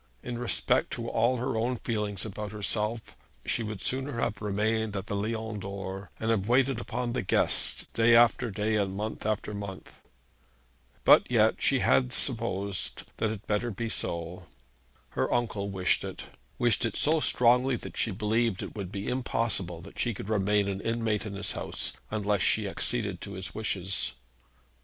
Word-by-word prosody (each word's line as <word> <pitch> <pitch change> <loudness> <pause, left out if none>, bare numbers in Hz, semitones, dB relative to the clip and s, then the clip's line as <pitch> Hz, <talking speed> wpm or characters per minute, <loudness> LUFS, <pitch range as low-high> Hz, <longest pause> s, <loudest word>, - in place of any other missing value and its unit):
In 120 -1 -4
respect 120 - +2
to 115 - -4
all 120 +3 +2
her 120 -1 -2
own 120 +3 0
feelings 105 -4 -2
about 105 0 -5
herself 105 +2 -1 0.3
she - - +1
would 105 -3 -4
sooner 130 -1 -1
have 110 - -1
remained 105 +1 0
at 95 -1 -3
the 100 - -3
Lion 110 +1 -2
d'Or, 95 0 -6
and 115 +1 0
have 100 -3 +1
waited 130 0 +3
upon 125 -1 -3
the 125 - 0
guests - - +1
day 115 +1 +5
after 120 +1 +5
day, 105 +2 0
and 95 -2 0
month 105 +1 -3
after 105 0 -1
month. 100 -2 -8 1.0
But - - +7
yet 110 -2 +3
she 135 -2 +3
had 125 -1 +3
supposed 100 -6 +1
'that - - 0
it - - -1
had 105 -1 -6
better 105 +3 0
be 115 +2 -3
so.' 85 -2 -3 0.6
Her 65 - -1
uncle 110 -4 0
wished 95 -2 +1
it, - - -6 0.3
wished 120 0 +2
it 115 -3 -1
so 160 +2 +3
strongly 125 -1 +4
that - - -8
she - - +1
believed 110 +1 0
it - - -7
would 100 -4 -5
be 100 0 -4
impossible 115 -9 -1
that 85 - -12
she 120 -3 0
could 100 - -7
remain 105 -1 +2
an 100 0 -2
inmate 115 -2 -1
in 100 - -6
his 100 0 0
house, - - -2 0.2
unless 105 -2 0
she 105 +2 +3
acceded 100 -2 -1
to 100 - -6
his 95 -1 -5
wishes. 95 - -1
110 Hz, 175 wpm, -29 LUFS, 100-115 Hz, 1.0 s, But